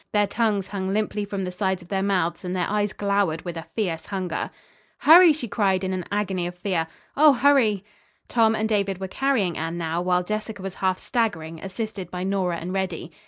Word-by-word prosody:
Their 205 -1 +4
tongues 205 -2 0
hung 190 -1 -3
limply 210 0 -1
from 200 -1 -4
the 180 - -3
sides 190 -1 -1
of 175 - -18
their 195 -1 0
mouths 185 -4 0
and 180 0 -3
their 180 - 0
eyes 205 0 0
glowered 200 -5 0
with 175 -2 -5
a 165 - -7
fierce 175 -7 -2
hunger. 185 -4 -3 0.5
"Hurry!" 340 +2 +8
she 290 -5 -2
cried, 195 -4 +1
in 190 0 -1
an 180 -2 -3
agony 190 -4 -1
of 175 0 -8
fear. 180 -3 -1 0.3
"Oh, 300 0 +7
hurry!" 245 -8 +3 0.4
Tom 225 -2 +3
and 220 0 0
David 200 -3 0
were 190 - -4
carrying 220 -6 0
Anne 165 +2 -3
now, 165 0 -1
while 180 0 +1
Jessica 215 0 -4
was 195 -1 -4
half 185 -1 +2
staggering, 165 -10 -2
assisted 195 0 -5
by 180 0 -4
Nora 190 -3 0
and 175 +3 -5
Reddy. 185 -3 -3
195 Hz, 205 wpm, -24 LUFS, 180-210 Hz, 0.5 s, Hurry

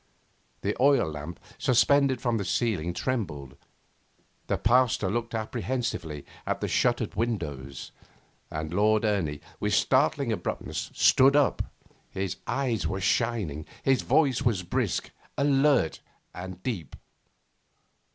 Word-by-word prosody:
The 100 +1 -1
oil 135 - +4
lamp, 75 +3 -7 0.2
suspended 135 +1 +3
from 120 -2 0
the - - -1
ceiling, 95 -4 0
trembled; 85 - -3 0.9
the - - 0
Pasteur 115 -4 +3
looked 115 +1 -2
apprehensively 110 - -3 0.2
at - - -1
the - - -2
shuttered - - +1
windows; 75 - -3 0.6
and 75 +1 -4
Lord 110 +3 +3
Ernie, 85 -9 0 0.2
with 105 0 +1
startling 135 +1 +2
abruptness, 110 - -3
stood 135 +2 +5
up. 145 -1 +3 0.5
His 95 -1 -3
eyes 130 -5 0
were 95 - -2
shining. 90 -6 0 0.2
His 135 -1 +3
voice 135 -6 +2
was 115 -8 +1
brisk, 85 - -1 0.3
alert, 140 - +3 0.3
and 95 0 -8
deep. 95 - -4
110 Hz, 115 wpm, -27 LUFS, 85-130 Hz, 0.9 s, stood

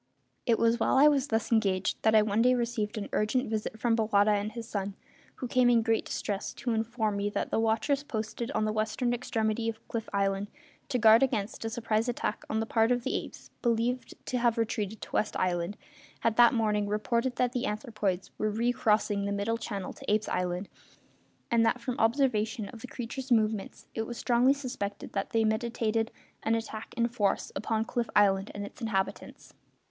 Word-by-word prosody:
It 230 -2 +4
was 230 +1 +3
while 265 - +2
I 285 +2 +8
was 285 -2 +3
thus 225 -1 -1
engaged 195 -4 +1
that 220 0 +4
I 215 - +7
one 210 +1 +1
day 250 +1 +5
received 235 -2 -2
an 205 - -3
urgent 235 +5 +1
visit 220 0 -3
from 235 -1 +2
Bowata 215 -2 +3
and 205 +1 0
his 230 -1 -7
son, 200 -3 -3 0.4
who 250 - -5
came 250 0 +4
in 235 -2 +4
great 225 -1 +1
distress 200 -1 -3
to 240 0 -2
inform 220 -2 -1
me 200 +1 0
that - - -3
the - - +1
watchers 225 +6 +1
posted 230 -3 -4
at 215 -6 0
the 215 - 0
western 220 +3 0
extremity 225 -2 -1
of 225 0 -8
Cliff 225 -1 -4
Island, 195 0 0 0.4
to 260 - +1
guard 225 -1 +7
against 225 -5 0
a - - -1
surprise 225 0 0
attack 225 -3 -2
on 220 - 0
the 220 - 0
part 225 +1 +2
of 245 -1 +1
the - - -1
apes - - -6
believed 240 +1 0
to 250 - -1
have 235 -1 +2
retreated 220 -2 -2
to - - -9
West 215 - 0
Island, 180 +2 -1 0.4
had 230 -1 +1
that 240 +1 +6
morning 210 -2 +1
reported 235 +4 0
that 250 -1 +1
the 250 +1 -1
anthropoids 210 -4 -2
were 215 - +1
recrossing 215 -2 +1
the 200 - -1
Middle 205 +3 -1
Channel 200 -5 -4
to - - -5
Apes' 215 0 +2
Island; 180 +1 -1 0.8
and 230 -1 +4
that, 230 +2 +2
from 250 0 -3
observation 225 -3 +1
of 230 -3 -11
the 250 - -7
creatures' 255 +2 -6
movements, 215 -3 +1
it 225 0 -3
was 240 - -6
strongly 245 +2 +4
suspected 250 -7 -5
that 195 - -2
they 225 -1 +2
meditated 225 0 0 0.3
an 225 - +1
attack 225 -1 -5
in 235 0 +3
force 225 -4 0
upon 220 0 -1
Cliff 240 -1 -2
Island 195 -1 +4
and 205 0 -4
its 205 - -12
inhabitants. 200 -4 -3
225 Hz, 195 wpm, -29 LUFS, 210-240 Hz, 0.8 s, I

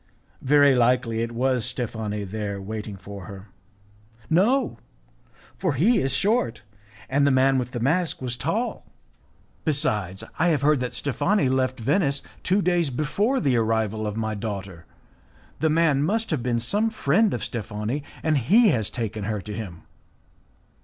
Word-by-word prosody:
"Very 145 0 +5
likely 125 -2 +2
it 115 0 -2
was 125 0 0
Steffani 110 -4 -3 0.3
waiting 105 +1 -6
there - - -14
for 100 -2 -8
her." 100 0 -10 0.8
"No, 220 +12 +2 0.8
for 180 -6 0
he 195 - +3
is 135 0 0
short, 195 - +1 0.4
and 140 +1 +2
the - - +5
man 135 0 +3
with 125 -1 -3
the 125 - -5
mask 160 +8 0
was 125 -2 -2
tall. 185 - -2 0.8
Besides, 105 - 0 0.2
I 175 - +3
have 150 -5 +1
heard 150 -1 +4
that 125 0 -3
Steffani 175 +8 +1
had 130 -1 +2
left 130 -1 0
Venice 140 - +1 0.2
two 195 +2 +1
days 175 -3 +2
before 195 - 0
the 135 -5 +1
arrival 110 -1 0
of 105 +1 -4
my 110 -1 -1
daughter. 100 -5 -6 0.7
The 160 - +2
man 155 -3 +3
must 220 +8 0
have 150 -6 0
been 120 -1 0
some 205 - +1
friend 215 +1 +2
of - - -3
Steffani, 110 +3 -3 0.2
and 155 -3 +2
he 210 - +5
has 110 - +1
taken 110 -3 -4
her 105 0 -2
to 105 +2 -7
him." 95 -6 -7
130 Hz, 160 wpm, -24 LUFS, 110-160 Hz, 0.8 s, Very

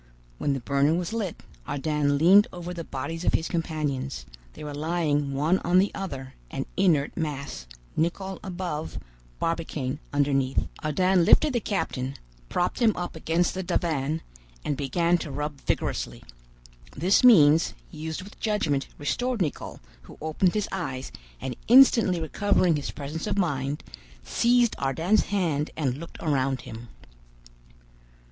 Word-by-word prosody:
When 145 - +1
the 135 - -2
burner 140 +5 +2
was 175 +4 -2
lit, 210 -7 -3 0.2
Ardan 145 0 0
leaned 190 +7 +7
over 175 0 -6
the 170 -1 -5
bodies 165 +4 -5
of - - +2
his 165 - 0
companions: 150 -5 -2 0.3
they - - -10
were 150 -1 -5
lying 150 -2 0
one 155 +7 +2
on 175 +1 +2
the 195 +2 +3
other, 135 -9 -6 0.2
an 135 - -4
inert 165 -7 +2
mass, 140 - -4 0.3
Nicholl 190 +4 -1
above, 175 - -4 0.4
Barbicane 155 -5 -2
underneath. 140 -2 +1 0.2
Ardan 180 +4 +3
lifted 295 - +5
the 240 - +2
captain, 140 - -2 0.3
propped 175 - 0
him 225 -4 +4
up 175 -1 -4
against 165 +2 +1
the 190 - -3
divan, 160 -4 -1 0.4
and 145 - 0
began 170 +6 +1
to 155 - -5
rub 145 0 -4
vigorously. - - -2 0.7
This 185 - +3
means, 165 -10 +6 0.2
used 160 +2 -5
with 205 - -14
judgment, 160 -11 0
restored 245 +11 -1
Nicholl, 160 -6 -3 0.2
who 65 - -14
opened 160 +4 +1
his 210 - 0
eyes, 135 -9 -4 0.3
and 130 - -4
instantly 230 -7 +6
recovering 180 +1 +2
his 145 -2 -3
presence 150 +5 -5
of - - -1
mind, 145 -6 -1 0.4
seized 235 - +3
Ardan's 165 +10 +2
hand 165 -7 0
and 135 -5 0
looked 165 - -9
around 135 -4 +1
him. 115 +2 -9
160 Hz, 140 wpm, -26 LUFS, 140-185 Hz, 0.7 s, leaned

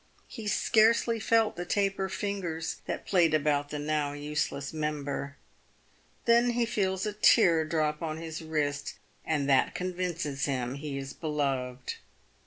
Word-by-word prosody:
He 225 -4 -7
scarcely 225 +2 +3
felt 225 0 +2
the 175 - -4
taper 195 +1 0
fingers 185 -5 -3
that - - -4
played 170 -5 +3
about 145 -1 +1
the 150 - -4
now 150 -1 -1
useless 145 -1 -3
member." 145 -2 -3 0.9
Then 235 +1 +4
he 240 0 +2
feels 190 -4 -1
a 210 - -2
tear 190 -6 +5
drop 155 -1 0
on 155 -2 -3
his 160 -1 -6
wrist, 150 -3 -2 0.3
and 145 -3 0
that 135 -2 +3
convinces 175 -6 -2
him 130 -3 -1
he 140 0 -5
is 135 0 -6
beloved. 135 -5 -2
155 Hz, 140 wpm, -29 LUFS, 145-190 Hz, 0.9 s, tear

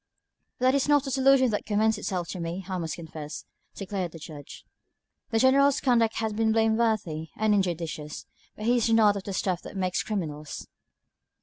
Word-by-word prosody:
"That 255 +1 +3
is 280 0 +1
not 290 -1 +4
a 270 - -3
solution 265 -1 +4
that 210 - -3
commends 215 +1 +2
itself 180 -4 -3
to 185 - -5
me, 170 +3 -4
I 185 -2 -3
must 165 -2 -3
confess," 155 -2 -8 0.3
declared 190 -3 -4
the - - -8
Judge. 150 -2 -10 0.6
"The 225 - 0
General's 275 +3 +4
conduct 230 -4 +2
has 220 -1 -1
been 220 +1 +1
blameworthy 220 -8 +1
and 215 -1 +2
injudicious, 165 -6 -2 0.3
but 215 - -6
he 245 +2 +3
is 235 -1 +1
not 220 -2 +5
of 195 - -5
the 200 - -4
stuff 185 -2 -1
that - - -9
makes 185 -1 0
criminals." 155 -8 -4
210 Hz, 180 wpm, -27 LUFS, 175-230 Hz, 0.6 s, not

